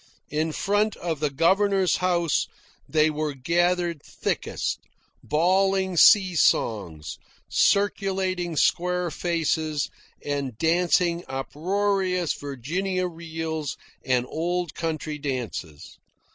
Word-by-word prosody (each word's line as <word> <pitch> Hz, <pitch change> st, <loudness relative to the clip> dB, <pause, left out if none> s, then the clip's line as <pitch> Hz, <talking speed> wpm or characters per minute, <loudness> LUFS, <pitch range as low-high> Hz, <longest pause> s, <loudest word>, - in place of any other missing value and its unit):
In 155 Hz, +2 st, 0 dB
front 205 Hz, +5 st, +1 dB
of 165 Hz, -4 st, -3 dB
the 150 Hz, 0 st, +1 dB
governor's 190 Hz, +6 st, +2 dB
house 175 Hz, -4 st, +1 dB, 0.4 s
they 155 Hz, 0 st, +3 dB
were 150 Hz, -1 st, -3 dB
gathered 170 Hz, +3 st, +1 dB
thickest, -, -, -3 dB, 0.4 s
bawling 190 Hz, +3 st, +2 dB
sea 190 Hz, +1 st, +6 dB
songs, 85 Hz, -, 0 dB, 0.3 s
circulating 190 Hz, -3 st, +1 dB
square 180 Hz, +1 st, +1 dB
faces, 160 Hz, -3 st, -1 dB, 0.3 s
and 140 Hz, -5 st, -3 dB
dancing 170 Hz, +2 st, +2 dB
uproarious 180 Hz, +5 st, 0 dB
Virginia 175 Hz, +8 st, -3 dB
reels 160 Hz, -3 st, -4 dB, 0.3 s
and 125 Hz, -1 st, +1 dB
old 175 Hz, +1 st, -2 dB
country 155 Hz, -2 st, -3 dB
dances. 120 Hz, -, -5 dB
170 Hz, 90 wpm, -25 LUFS, 150-185 Hz, 0.4 s, sea